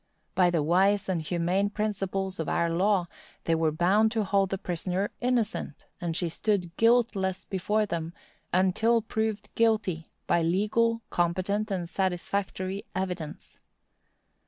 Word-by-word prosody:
By 180 -2 +4
the 165 -4 +1
wise 195 +5 +3
and 180 -4 0
humane 175 +5 0
principles 195 -3 -2
of 160 - -2
our 170 0 +1
law, 185 +1 +2 0.4
they 165 - +1
were 160 -1 +2
bound 190 +7 +3
to 220 -2 +1
hold 195 -1 +2
the 195 - -1
prisoner 185 +3 -2
innocent, 240 - -1 0.2
and 170 -2 -2
she 175 - 0
stood 175 0 -1
guiltless 220 -5 +2
before 210 +3 0
them, 165 -4 -3 0.4
until 215 +5 +3
proved 220 -1 -2
guilty, 215 -8 +1 0.2
by 170 - +2
legal, 215 +7 +1
competent, 185 +5 0
and 180 -4 -2
satisfactory 190 +1 -2
evidence. 180 -5 -5
190 Hz, 135 wpm, -28 LUFS, 175-210 Hz, 0.4 s, By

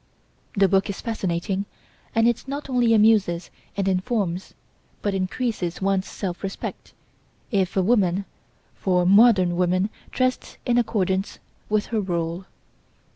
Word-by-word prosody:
The 195 -1 +5
book 195 +1 +2
is 200 - -4
fascinating 195 -3 -2 0.5
and 225 +1 +4
it 240 +2 0
not 280 0 -5
only 240 -2 +4
amuses 210 -5 +3 0.3
and 195 -1 0
informs, 190 -1 -1 0.5
but 205 - 0
increases 190 -1 -2
one's 195 0 0
self 180 -3 -5
respect, 195 -1 -6 0.6
if 195 -3 0
a 190 - +4
woman, 195 -3 +2 0.5
for 180 -2 +1
modern 195 -3 +6
woman 185 +3 +1 0.2
dressed 255 0 -1
in 245 0 +3
accordance 195 -4 0 0.3
with 210 0 +1
her 220 - +2
rôle. 170 -1 -2
195 Hz, 130 wpm, -24 LUFS, 185-225 Hz, 0.6 s, modern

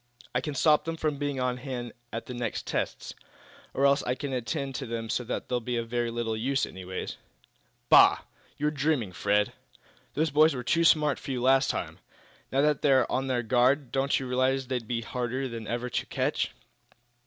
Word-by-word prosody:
"I 125 - +1
can 150 +1 -4
stop 150 +3 +4
them 165 0 -3
from 150 -3 -1
being 145 -2 -2
on 125 -1 0
hand 125 -2 -5 0.2
at 115 - -5
the 125 - -7
next 120 -2 -3
tests. - - -3 0.6
Or 135 - +1
else 140 +1 +4
I 125 - -1
can 140 0 -4
attend 130 +2 -2
to 135 - -5
them 115 -1 -4
so 125 - 0
that - - -4
they'll 125 - 0
be 120 +1 -3
of 115 -1 -3
very 120 0 0
little 115 -1 -2
use, 135 +5 0
anyway." 95 0 -6 0.8
"Bah! - - +7 0.4
You're 150 +1 +1
dreaming, 145 -8 0
Fred! 105 +2 +1 0.6
The 155 - +2
boys 155 +1 +5
were 125 - -4
too 165 +7 +2
smart 150 -3 +4
for - - -9
you 130 -2 -1
last 130 +2 +4
time; - - -3 0.5
Now 135 - +2
that 150 -1 +2
they're 135 -3 +4
on 135 +1 0
their 125 -2 0
guard, 125 +3 +2
don't 135 +1 +1
you 135 - -5
realize 130 +1 +1
they'd 125 -3 -3
be 115 0 -1
harder 125 +2 -3
than 115 -3 -7
ever 120 +1 -2
to - - -1
catch." - - -1
130 Hz, 200 wpm, -28 LUFS, 120-140 Hz, 0.8 s, Bah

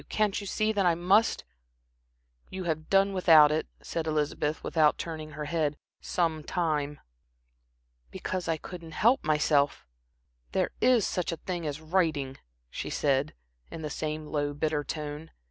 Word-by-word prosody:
Can't 210 -2 +1
you 200 - -7
see 215 +2 +1
that 205 -2 +1
I 175 -2 +4
must?" 190 +6 +3 1.1
"You 190 0 -5
have 155 -2 -3
done 195 0 +4
without 160 -5 +7
it," 155 +1 -1 0.2
said 165 -1 -3
Elizabeth, 150 0 -1
without 155 -2 +3
turning 155 -2 -6
her 150 - -3
head, 150 -2 -1 0.2
"some 160 -3 -1
time." 150 -4 -1 1.1
"Because 180 - -4
I 165 -1 +1
couldn't 165 0 -9
help 235 - +3
myself." 150 -2 +2 0.7
"There - - +1
is 250 -5 +4
such 180 -1 -1
a 165 - -4
thing 175 -3 -4
as 150 +1 -4
writing," 155 -5 0 0.3
she - - -5
said, 140 +1 0 0.3
in 160 - -7
the 150 - -4
same 155 0 -3
low, 145 -1 -2
bitter 150 0 0
tone. 150 +1 -5
160 Hz, 150 wpm, -28 LUFS, 150-180 Hz, 1.1 s, without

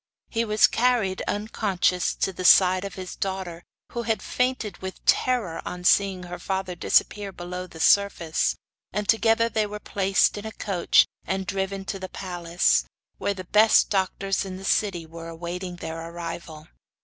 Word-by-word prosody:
He 230 0 +1
was 215 -1 +4
carried, 230 -6 +1
unconscious, 200 -4 0
to 190 - -1
the 185 - -6
side 185 0 +6
of 195 - -7
his 185 -1 -7
daughter, 190 -3 -4 0.3
who 235 - -3
had 225 -1 -1
fainted 250 -6 -1
with 190 0 -8
terror 235 -10 +1
on 180 0 -6
seeing 190 0 +3
her 175 0 -7
father 190 -1 -3
disappear 200 +3 +1
below 180 0 -6
the 165 - -13
surface, 185 -3 +2 0.4
and 210 +1 -3
together 225 0 +3
they 215 -2 0
were 210 +1 -6
place 195 -1 +2
in 205 - -8
a - - -6
coach 190 -5 +3 0.2
and 190 0 -1
driven 195 0 -3
to 195 - -4
the 185 0 -6
palace, 175 - +1 0.4
where 200 - -1
the 185 - -6
best 215 +4 +4
doctors 195 0 0
in 190 -1 -6
the 190 - -9
city 190 -5 0
were 165 +1 -9
awaiting 175 +2 -6
their 165 -1 -6
arrival. 165 -2 -7
190 Hz, 165 wpm, -25 LUFS, 175-205 Hz, 0.4 s, side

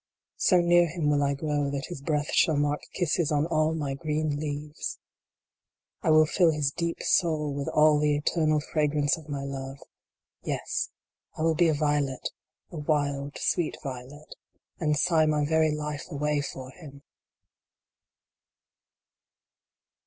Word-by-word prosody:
So 180 - +4
near 175 0 +4
him 160 -2 -1
will 145 -1 +2
I 140 0 +1
grow 145 -1 -1
that 140 0 -3
his 175 -6 -7
breath 150 0 -1
shall 160 -3 +4
mark 145 0 0
kisses 170 -3 0
on 150 0 +2
all 160 -1 +1
my 145 -3 -2
green 150 0 -2
leaves! 150 0 -4 1.0
I - - 0
will 155 0 +6
fill 170 +2 +3
his 150 -3 0
deep 170 +2 -3
soul 155 -4 +1
with 140 0 -4
all 150 -1 +4
the 150 -1 +2
eternal 155 0 +1
fragrance 150 -1 +1
of 155 -2 -13
my 140 -1 -3
love! 135 0 -6 0.6
Yes, - - -2 0.5
I 155 - -2
will 165 0 +3
be 170 +2 +3
a 160 - +2
violet 145 -3 0 0.4
a 170 - -7
wild 145 -2 -1
sweet 170 -3 0
violet 135 +2 -8 0.5
and 150 -3 +1
sigh 160 0 +3
my 150 -1 +1
very 160 +1 +3
life 150 +1 -4
away 150 -1 0
for 130 -2 -7
him 140 -3 -13
150 Hz, 145 wpm, -27 LUFS, 145-155 Hz, 1.0 s, will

